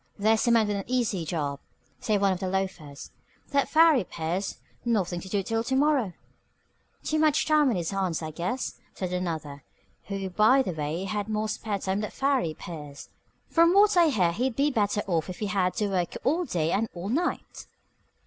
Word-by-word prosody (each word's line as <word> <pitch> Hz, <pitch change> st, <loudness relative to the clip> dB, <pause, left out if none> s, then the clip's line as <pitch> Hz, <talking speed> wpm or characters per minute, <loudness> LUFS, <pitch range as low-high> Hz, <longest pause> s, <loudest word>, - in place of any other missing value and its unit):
"There's 220 Hz, +3 st, +2 dB
a -, -, +5 dB
man 225 Hz, -2 st, +4 dB
with 205 Hz, -1 st, -1 dB
an 195 Hz, -, -3 dB
easy 235 Hz, -9 st, 0 dB
job," 145 Hz, -4 st, -2 dB, 0.4 s
said 210 Hz, -2 st, 0 dB
one 195 Hz, -1 st, +3 dB
of 180 Hz, -, -5 dB
the 190 Hz, -, -3 dB
loafers. 180 Hz, -7 st, -4 dB, 0.4 s
"That 280 Hz, -1 st, +1 dB
Farry 315 Hz, -6 st, +5 dB
Pierce. 175 Hz, +3 st, -3 dB, 0.3 s
Nothing 190 Hz, -7 st, 0 dB
to 190 Hz, -, -9 dB
do 200 Hz, 0 st, 0 dB
till 225 Hz, +3 st, -1 dB
to 265 Hz, +3 st, -1 dB
morrow." 270 Hz, -8 st, +2 dB, 0.9 s
"Too 310 Hz, -, 0 dB
much 310 Hz, 0 st, +3 dB
time 305 Hz, -3 st, +4 dB
on 235 Hz, -, +1 dB
his 170 Hz, -1 st, -2 dB
hands, 190 Hz, -4 st, -1 dB
I 155 Hz, -, -4 dB
guess," 180 Hz, -, -3 dB, 0.2 s
said 185 Hz, -1 st, -4 dB
another, 160 Hz, -6 st, -3 dB, 0.4 s
who 195 Hz, -1 st, -4 dB
by 220 Hz, +8 st, +5 dB
the 185 Hz, -, -3 dB
way 155 Hz, +3 st, -3 dB
had 205 Hz, +2 st, -3 dB
more 215 Hz, 0 st, -1 dB
spare 215 Hz, -1 st, -3 dB
time 190 Hz, +1 st, -2 dB
than 210 Hz, -, -3 dB
Farry 265 Hz, -, 0 dB
Pierce. 150 Hz, -4 st, -9 dB, 0.4 s
"From 335 Hz, +2 st, +4 dB
what 410 Hz, 0 st, +6 dB
I 345 Hz, -2 st, +6 dB
hear 190 Hz, -, +2 dB
he'd 245 Hz, +6 st, -1 dB
be 290 Hz, +2 st, +2 dB
better 205 Hz, -3 st, 0 dB
off 170 Hz, -2 st, -1 dB
if 180 Hz, -, -6 dB
he 215 Hz, -, -3 dB
had 195 Hz, -3 st, 0 dB
to 210 Hz, -3 st, 0 dB
work 180 Hz, -3 st, -1 dB
all 330 Hz, +7 st, +1 dB
day 165 Hz, -, -1 dB
and 220 Hz, +4 st, 0 dB
all 175 Hz, +3 st, -5 dB
night." 330 Hz, +9 st, -2 dB
200 Hz, 195 wpm, -27 LUFS, 175-255 Hz, 0.9 s, what